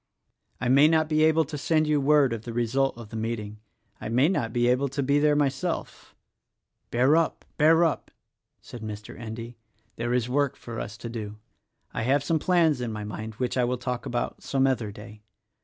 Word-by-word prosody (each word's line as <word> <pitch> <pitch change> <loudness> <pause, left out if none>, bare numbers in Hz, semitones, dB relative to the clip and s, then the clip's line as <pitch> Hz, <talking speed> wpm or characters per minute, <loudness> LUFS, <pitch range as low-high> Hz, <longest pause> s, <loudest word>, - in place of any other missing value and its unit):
I 125 - -2
may 140 +4 +6
not 160 -1 +3
be 155 0 +2
able 160 0 +3
to 150 +1 -6
send 155 +2 +2
you 150 -1 +2
word 140 -3 +4
of 115 - -4
the 115 +1 -7
result 120 +3 0
of 115 -3 -10
the - - -9
meeting 110 -2 -4 0.2
— 115 -3 -39
I - - -4
may 130 +7 +3
not 145 -12 -1
be 120 +1 +1
able 125 +3 +2
to 140 +2 -2
be 140 +2 +2
there 150 0 +3
myself 140 -2 -2 0.3
— - - -58
" - - -52
"Bear 130 +5 +3
up 165 0 0
— - - -42
bear 160 +3 +5
up!" 160 -4 0 0.5
said 120 - -10
Mr. 105 -1 -7
Endy, 115 +1 -7 0.4
"there 120 +1 -2
is 125 -2 0
work 140 +1 0
for 115 -1 -8
us 105 -2 -6
to 120 - -7
do. 105 -2 -6 0.6
I - - -2
have 135 +5 +2
some 160 +2 +1
plans 165 -6 +2
in 120 -2 -3
my 105 -1 -5
mind 110 +1 -6
which 125 +2 -2
I 125 - +3
will 125 +1 0
talk 125 0 -4
about 120 - -3
some 135 -1 +1
other 125 -6 0
day. 105 +1 -12
125 Hz, 220 wpm, -26 LUFS, 115-145 Hz, 0.6 s, may